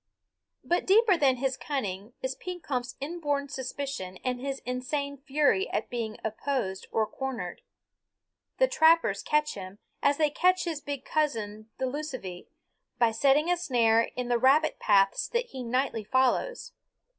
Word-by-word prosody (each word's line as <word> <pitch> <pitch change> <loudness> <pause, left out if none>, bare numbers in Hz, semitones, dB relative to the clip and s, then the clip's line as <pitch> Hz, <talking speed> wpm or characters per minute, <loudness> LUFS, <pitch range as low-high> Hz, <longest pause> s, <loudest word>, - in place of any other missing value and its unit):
But 350 - 0
deeper 415 0 +6
than 275 -5 +3
his 260 +1 -1
cunning 240 -6 -4
is 260 0 -1
Pekompf's 265 -7 -4
inborn 290 -2 -2
suspicion 260 -8 -5
and 250 -1 -2
his 275 0 -3
insane 280 +3 -2
fury 300 +7 +2
at - - -3
being 225 -3 -3
opposed 220 -3 -2
or 220 - +2
cornered. 265 +2 -5 1.0
The - - +4
trappers 320 - +4
catch 300 0 +1
him, 190 0 -8 0.2
as 285 0 +3
they 305 -2 +2
catch 365 +4 +3
his 325 -4 -3
big 280 -2 -5
cousin 220 -8 -1
the 260 - -1
lucivee, 255 - -5 0.5
by 235 -2 +4
setting 280 +8 +3
a 355 - +2
snare 230 -8 +3
in 250 -1 -3
the 240 -1 +2
rabbit 280 +5 +4
paths 195 -2 +3
that 480 0 -1
he 260 - -7
nightly 245 -1 -1
follows. 260 - +1
265 Hz, 145 wpm, -28 LUFS, 230-300 Hz, 1.0 s, deeper